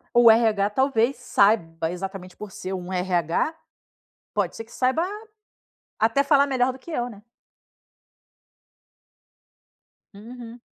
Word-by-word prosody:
O 240 -1 +8
RH 220 -3 +3
talvez 260 +1 +1
saiba 170 -9 +1
exatamente 185 0 -7
por 210 -2 -9
ser 190 0 -6
um 180 -1 -5
RH. 180 - 0 0.8
Pode - - -1
ser - - -6
que 230 - -22
saiba 260 +6 +1 1.0
até 225 +5 +3
falar 280 0 +4
melhor 260 -2 +1
do 260 - -12
que 335 - -12
eu, 245 -6 -2
né. 210 -4 -13 2.9
Uhum. 235 +3 -10
225 Hz, 115 wpm, -24 LUFS, 190-250 Hz, 2.9 s, O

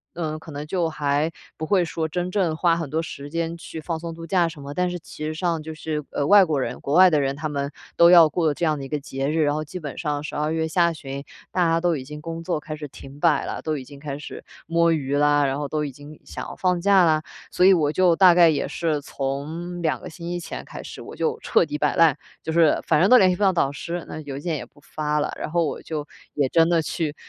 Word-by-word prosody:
呃， 155 -2 -3
可 160 0 -11
能 145 +1 -6
就 170 0 0
还 150 +1 0 0.3
不 155 - -3
会 185 +2 +3
说 160 -1 -2
真 175 +3 -3
正 180 -4 0
花 170 0 +3
很 165 -3 -3
多 160 +3 0
时 145 -3 -8
间 165 0 -2
去 165 - -8
放 165 +1 -3
松 165 0 -6
度 165 0 -9
假 180 -2 +2
什 160 -3 -11
么。 140 +1 -7
但 180 0 +1
是 175 - -4
其 155 -1 -8
实 155 - -2
上 165 -1 -1
就 160 +1 -6
是， 155 -1 -4
呃， 140 - -1
外 200 +1 +7
国 150 -5 0
人， - - -4
国 140 - -3
外 185 +3 +8
的 155 -3 +2
人 135 -1 0
他 155 +2 -4
们 140 -1 -3 0.3
都 170 0 +7
要 170 -3 +8
过 160 -1 +1
这 160 - -6
样 155 -2 +1
的 135 - -6
一 - - -7
个 150 - -1
节 135 0 -4
日， 160 +1 +1
然 145 0 +1
后 155 - -2
基 155 +4 -7
本 150 -5 -7
上 150 -3 -2
12 150 0 -2
月 160 0 0
下 170 +1 +2
旬 140 -2 -7 0.3
大 180 -2 +2
家 165 0 +2
都 175 -1 +2
已 130 - -6
经 150 +3 -9
工 165 +1 -6
作 170 -2 -1
开 155 +1 -6
始 150 -1 -7
停 135 +1 -12
摆 - - +3
了， - - -4
都 155 -1 -1
已 135 - -6
经 140 +2 -13
开 140 -1 -5
始 - - -9 0.2
摸 170 +1 +3
鱼 140 -3 -1
啦， 145 0 +4
然 135 +1 -1
后 145 0 -3
都 150 +2 -2
已 145 - -5
经 145 +3 -13
想 - - -7
要 - - -8
放 180 -1 +1
假 195 -1 +5
啦。 155 -1 +2 0.3
所 180 - +3
以 195 - +8
我 155 -5 +2
就 180 +1 +3
大 180 -1 +7
概 175 -2 +7
也 155 - 0
是 155 -3 -1
从 155 +7 -4
2 160 -2 0
个 - - -9
星 170 +1 -7
期 175 0 -2
前 170 - -7
开 - - -9
始， - - -9
我 - - -10
就 460 -1 -1
彻 - - +2
底 295 - -4
摆 - - +1
烂， 165 -4 +5 0.3
就 160 - -3
是 165 -2 +4
反 150 - +3
正 190 - +4
都 255 - +9
联 190 -5 +5
系 - - 0
不 180 - -9
到 195 -2 +5
导 155 -6 +1
师， 170 +4 -5
那 155 - -7
邮 140 -2 -6
件 155 +2 -2
也 - - -7
不 - - -23
发 150 +1 -2
了， - - -1
然 - - -4
后 170 0 +2
我 - - -4
就 155 -2 -5 0.3
也 145 -2 +2
真 165 +2 +4
的 170 -1 +3
去 155 -1 -3
160 Hz, 295 characters per minute, -23 LUFS, 145-170 Hz, 0.3 s, 都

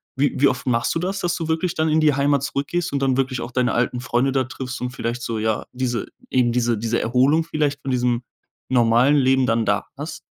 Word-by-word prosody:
wie 140 +2 +1
wie 140 - +6
oft 125 -1 -2
machst 115 -2 +1
du - - +1
das, 190 +3 -2
dass 175 -1 0
du 165 -3 -4
wirklich 160 +2 -1
dann 160 0 +1
in 155 +1 +3
die 150 -1 +4
Heimat 140 -1 +2
zurückgehst 145 +5 -2
und 140 - +1
dann 135 -1 +1
wirklich 130 -2 -1
auch 120 - -6
deine 125 0 +1
alten 125 +1 0
Freunde 125 +2 +1
da 135 -1 +1
triffst 130 0 -6
und 125 0 -3
vielleicht 120 -2 -4
so, 115 -1 -3
ja, 110 0 -1
diese 125 -2 -2 0.2
eben 125 -2 +2
diese 120 -1 +1
diese 115 +2 -1
Erholung 130 +7 +3
vielleicht 150 -3 -1
von 135 - -3
diesem 125 -1 0 0.5
normalen 120 +3 +4
Leben 130 -1 +3
dann 115 -1 +1
da 100 0 0
hast? 150 +3 -6
130 Hz, 230 wpm, -22 LUFS, 120-145 Hz, 0.5 s, wie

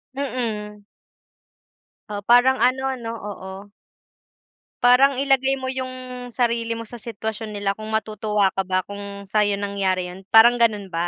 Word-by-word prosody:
Mm. 220 -6 -4 1.3
Oo, 205 - -3
parang 245 +2 +5
ano 255 +2 +2 0.2
'no, 230 -1 -5
oo. 200 -1 -8 1.1
Parang 255 +3 +6
ilagay 270 0 +2
mo 260 -1 -4
yung 255 -1 -6
sarili 235 -1 -1
mo 230 - -6
sa 235 +2 -10
sitwasyon 220 -1 -5
nila 200 -1 0
kung 215 +2 -8
matutuwa 215 -2 0
ka 195 -1 -3
ba 185 0 +1
kung 200 0 -8
sayo 205 0 +1
nangyari 195 -3 -1
yun, 190 +1 -13
parang 235 +3 +6
gano'n 210 -5 +1
ba? 170 +1 -1
220 Hz, 140 wpm, -22 LUFS, 200-245 Hz, 1.3 s, Parang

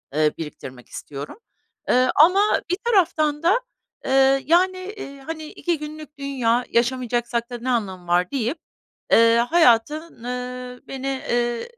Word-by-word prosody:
ııı, 155 0 +3
biriktirmek 130 -5 -9
istiyorum. 145 - -8 0.5
Eee, 255 +1 +4
ama 380 +7 +5
bir 360 - +1
taraftan 330 -8 +2
da, 380 +8 +4 0.5
eee, 270 0 +3
yani, 370 +4 +1
iii, 280 -8 -9
hani, 315 +2 -6
2 340 +2 -3
günlük 300 0 -9
dünya, 250 -4 0
yaşamayacaksak 240 -1 0
da 245 - -5
ne 245 +2 -5
anlamı 190 -7 -2
var 175 +1 +1
deyip, 265 +2 -1 0.5
eee, 230 0 +6
hayatın, 305 -1 +2
ııı, 250 0 -6
beni, 270 0 -4
ııı, 240 -1 0
260 Hz, 130 wpm, -22 LUFS, 235-310 Hz, 0.5 s, eee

